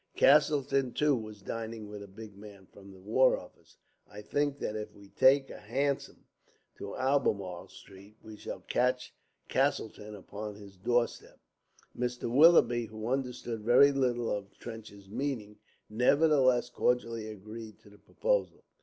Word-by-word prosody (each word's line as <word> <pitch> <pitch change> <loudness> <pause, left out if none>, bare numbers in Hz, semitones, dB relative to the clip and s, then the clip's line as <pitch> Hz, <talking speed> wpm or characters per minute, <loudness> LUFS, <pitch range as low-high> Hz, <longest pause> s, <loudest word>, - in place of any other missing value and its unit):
Castleton, 140 -2 +4
too, 150 -1 +2
was 110 -3 -8
dining 115 0 -5
with 105 0 -8
a 100 - -9
big 105 +1 -11
man 100 -1 -13
from 100 +1 -15
the 95 - -14
War 115 +7 +3
Office. - - -15 0.3
I 105 0 -9
think 145 +5 -1
that 105 - -4
if 105 0 -6
we 100 -1 -16
take 135 +4 +4
a - - -9
hansom 135 +6 -2 0.5
to - - -6
Albemarle 105 -10 0
Street, 100 +2 -15
we 110 -1 -10
shall - - -7
just - - -26
catch 125 0 0 0.3
Castleton 105 0 -1
upon 105 +1 -7
his 100 -1 -13
door 120 +5 +2
step." - - -15 0.6
Mr. 125 0 -3
Willoughby, 135 -5 +6
who 110 +1 -6
understood 125 -3 -3
very 120 +6 +6
little 125 -4 0
of 100 -1 -5
Trench's 110 -4 -10
meaning, 110 -2 -4 0.3
nevertheless 130 +1 +3
cordially 115 -3 0
agreed 110 +1 -9
to 105 - -18
the 105 - -18
proposal. - - -1
115 Hz, 150 wpm, -30 LUFS, 105-130 Hz, 0.6 s, Willoughby